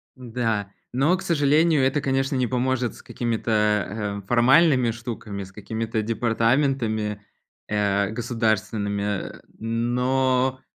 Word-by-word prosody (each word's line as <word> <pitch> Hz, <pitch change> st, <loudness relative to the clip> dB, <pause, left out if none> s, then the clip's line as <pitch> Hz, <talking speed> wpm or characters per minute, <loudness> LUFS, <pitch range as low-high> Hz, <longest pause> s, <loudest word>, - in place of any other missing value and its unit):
Да, 115 Hz, -5 st, -2 dB, 0.2 s
но, 140 Hz, +8 st, +3 dB
к -, -, -8 dB
сожалению, 155 Hz, -1 st, +3 dB
это, 135 Hz, +3 st, +2 dB
конечно, 135 Hz, 0 st, 0 dB
не 130 Hz, -1 st, +1 dB
поможет 125 Hz, 0 st, -1 dB
с -, -, -13 dB
какими-то, 105 Hz, -3 st, -1 dB
э, 95 Hz, -, -23 dB
формальными 130 Hz, +1 st, +4 dB
штуками, 110 Hz, -3 st, -6 dB
с 95 Hz, -, -12 dB
какими-то 110 Hz, +2 st, -3 dB
департаментами, 115 Hz, -1 st, 0 dB, 0.5 s
э, 100 Hz, -1 st, +1 dB
государственными. 110 Hz, -3 st, -1 dB, 0.3 s
Но 125 Hz, +3 st, 0 dB
115 Hz, 105 wpm, -24 LUFS, 105-130 Hz, 0.5 s, формальными